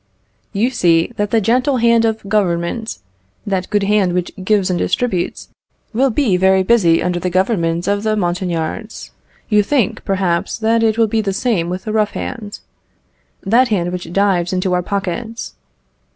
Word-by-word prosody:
You 220 Hz, +5 st, 0 dB
see 170 Hz, -6 st, +2 dB
that 205 Hz, 0 st, -1 dB
the 225 Hz, -, +3 dB
gentle 250 Hz, +6 st, +1 dB
hand 230 Hz, -1 st, +3 dB
of 220 Hz, -2 st, -2 dB
Government 195 Hz, -, -1 dB, 0.5 s
that 190 Hz, -2 st, -2 dB
good 205 Hz, -1 st, +1 dB
hand 200 Hz, -3 st, +2 dB
which 180 Hz, -1 st, -1 dB
gives 195 Hz, -2 st, +2 dB
and 175 Hz, -, -1 dB
distributes, 195 Hz, -8 st, -1 dB, 0.4 s
will 265 Hz, +4 st, +2 dB
be 225 Hz, -6 st, +1 dB
very 190 Hz, +1 st, +3 dB
busy 185 Hz, -6 st, +3 dB
under 180 Hz, -1 st, -1 dB
the 180 Hz, +1 st, -2 dB
government 175 Hz, -3 st, 0 dB
of 200 Hz, 0 st, +1 dB
the 215 Hz, 0 st, 0 dB
Montagnards. 180 Hz, +2 st, -3 dB, 0.4 s
You 210 Hz, -1 st, +4 dB
think, 235 Hz, 0 st, 0 dB
perhaps, 185 Hz, -3 st, -1 dB
that 225 Hz, +1 st, +1 dB
it 225 Hz, -1 st, +2 dB
will 230 Hz, -, +4 dB
be 220 Hz, +1 st, 0 dB
the 195 Hz, -2 st, -2 dB
same 200 Hz, -5 st, 0 dB
with 185 Hz, +1 st, -4 dB
the 215 Hz, -, -4 dB
rough 215 Hz, -2 st, +1 dB
hand 215 Hz, -4 st, -6 dB, 0.8 s
that 235 Hz, +6 st, +3 dB
hand 180 Hz, -6 st, -1 dB
which 180 Hz, -2 st, -6 dB
dives 185 Hz, -2 st, +1 dB
into 185 Hz, 0 st, 0 dB
our 180 Hz, -, +2 dB
pockets. 200 Hz, +5 st, -4 dB
200 Hz, 165 wpm, -17 LUFS, 180-225 Hz, 0.8 s, You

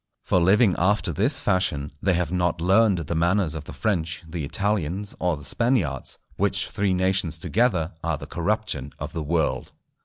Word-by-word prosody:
For 90 Hz, -, +2 dB
living 95 Hz, +3 st, +4 dB
after 100 Hz, +4 st, +1 dB
this -, -, +2 dB
fashion, 75 Hz, -6 st, 0 dB
they 95 Hz, -2 st, +2 dB
have 90 Hz, 0 st, -1 dB
not 90 Hz, -2 st, 0 dB
learned 95 Hz, +3 st, +4 dB
the 85 Hz, -1 st, -3 dB
manners 85 Hz, 0 st, +1 dB
of 80 Hz, -2 st, -6 dB
the -, -, -9 dB
French, 85 Hz, -7 st, -2 dB
the 80 Hz, -1 st, -5 dB
Italians, 100 Hz, +2 st, -1 dB
or 90 Hz, -4 st, 0 dB
the 70 Hz, -, -11 dB
Spaniards, 90 Hz, -, 0 dB, 0.2 s
which -, -, +1 dB
three 100 Hz, -2 st, 0 dB
nations 95 Hz, -3 st, +1 dB
together 90 Hz, -3 st, +1 dB
are 85 Hz, -2 st, 0 dB
the -, -, -8 dB
corruption 85 Hz, -7 st, -2 dB
of -, -, -6 dB
the 80 Hz, -, -3 dB
world. 80 Hz, +2 st, -1 dB
90 Hz, 175 wpm, -24 LUFS, 80-100 Hz, 0.2 s, living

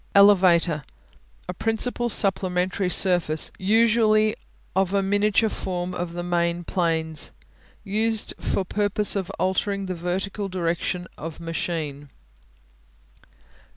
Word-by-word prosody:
Elevator 180 Hz, -6 st, +5 dB, 0.6 s
A 180 Hz, -, -4 dB
principal 225 Hz, +4 st, 0 dB
supplementary 185 Hz, -2 st, +1 dB
surface, 175 Hz, -4 st, +2 dB
usually 215 Hz, +1 st, +3 dB, 0.4 s
of 190 Hz, 0 st, +1 dB
a 195 Hz, -, +2 dB
miniature 205 Hz, +3 st, +2 dB
form 180 Hz, -3 st, -4 dB
of 175 Hz, -1 st, -4 dB
the 175 Hz, 0 st, -4 dB
main 175 Hz, 0 st, -1 dB
planes. 160 Hz, -3 st, -1 dB, 0.5 s
Used 220 Hz, +2 st, 0 dB
for 190 Hz, -, -1 dB
purpose 205 Hz, +2 st, +1 dB
of 190 Hz, -3 st, -2 dB
altering 195 Hz, +1 st, -1 dB
the 185 Hz, -, -3 dB
vertical 190 Hz, +4 st, -3 dB
direction 175 Hz, 0 st, -2 dB
of 160 Hz, +1 st, -7 dB
machine. 160 Hz, -4 st, -4 dB
185 Hz, 105 wpm, -24 LUFS, 170-205 Hz, 0.6 s, Elevator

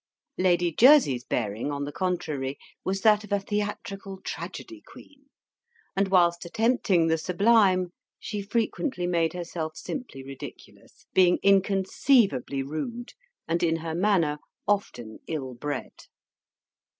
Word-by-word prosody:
Lady 175 Hz, -2 st, +3 dB
Jersey's 230 Hz, -, +5 dB
bearing, 115 Hz, +3 st, -2 dB
on 145 Hz, 0 st, -3 dB
the 145 Hz, -, -4 dB
contrary, 150 Hz, -6 st, -2 dB, 0.3 s
was 195 Hz, +1 st, -2 dB
that 210 Hz, 0 st, +4 dB
of 210 Hz, -, -13 dB
a 200 Hz, -, +2 dB
theatrical 200 Hz, -1 st, -4 dB
tragedy 335 Hz, -, -7 dB
queen; 280 Hz, -1 st, -17 dB, 0.7 s
and 195 Hz, 0 st, +2 dB
whilst 175 Hz, -2 st, +3 dB
attempting 215 Hz, -2 st, +2 dB
the 160 Hz, 0 st, +1 dB
sublime, 185 Hz, 0 st, +3 dB, 0.3 s
she 210 Hz, -1 st, -4 dB
frequently 225 Hz, -, -1 dB
made 170 Hz, -2 st, +1 dB
herself 165 Hz, -3 st, -5 dB
simply 245 Hz, -, -6 dB
ridiculous, 135 Hz, 0 st, -12 dB
being 180 Hz, -1 st, +5 dB
inconceivably 195 Hz, -, +2 dB
rude, 195 Hz, -, -5 dB, 0.3 s
and 170 Hz, +1 st, 0 dB
in 165 Hz, -1 st, +2 dB
her 165 Hz, 0 st, -4 dB
manner 170 Hz, -5 st, +1 dB, 0.3 s
often 120 Hz, -, -2 dB
ill 135 Hz, -5 st, -4 dB
bred. 145 Hz, +2 st, -5 dB
180 Hz, 120 wpm, -26 LUFS, 155-205 Hz, 0.7 s, Jersey's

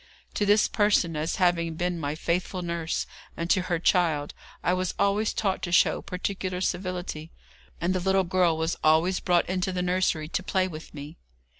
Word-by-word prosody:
To 205 Hz, -, 0 dB
this 210 Hz, +1 st, +5 dB
person, 205 Hz, -6 st, +2 dB
as 155 Hz, +2 st, -1 dB
having 170 Hz, -4 st, +1 dB
been 175 Hz, +1 st, -2 dB
my 145 Hz, -1 st, -2 dB
faithful 180 Hz, +3 st, -2 dB
nurse, 170 Hz, -1 st, -2 dB, 0.3 s
and 170 Hz, +1 st, -1 dB
to 185 Hz, -, +4 dB
her 175 Hz, -, +2 dB
child, 165 Hz, -4 st, +1 dB, 0.3 s
I 180 Hz, -, +2 dB
was 185 Hz, -1 st, -1 dB
always 200 Hz, +2 st, +2 dB
taught 195 Hz, -3 st, -1 dB
to 175 Hz, -, -4 dB
show 175 Hz, -, +4 dB
particular 185 Hz, 0 st, -3 dB
civility, 180 Hz, -3 st, -3 dB, 0.5 s
and 175 Hz, +2 st, 0 dB
the 185 Hz, -, 0 dB
little 190 Hz, +1 st, +2 dB
girl 180 Hz, -2 st, +2 dB
was 160 Hz, +1 st, -1 dB
always 160 Hz, +4 st, +3 dB
brought 175 Hz, -2 st, +2 dB
into 185 Hz, 0 st, -1 dB
the 180 Hz, -1 st, -2 dB
nursery 180 Hz, -4 st, 0 dB
to 175 Hz, -, -2 dB
play 185 Hz, 0 st, 0 dB
with 160 Hz, -3 st, -9 dB
me. 145 Hz, +3 st, -9 dB
180 Hz, 180 wpm, -26 LUFS, 165-185 Hz, 0.5 s, this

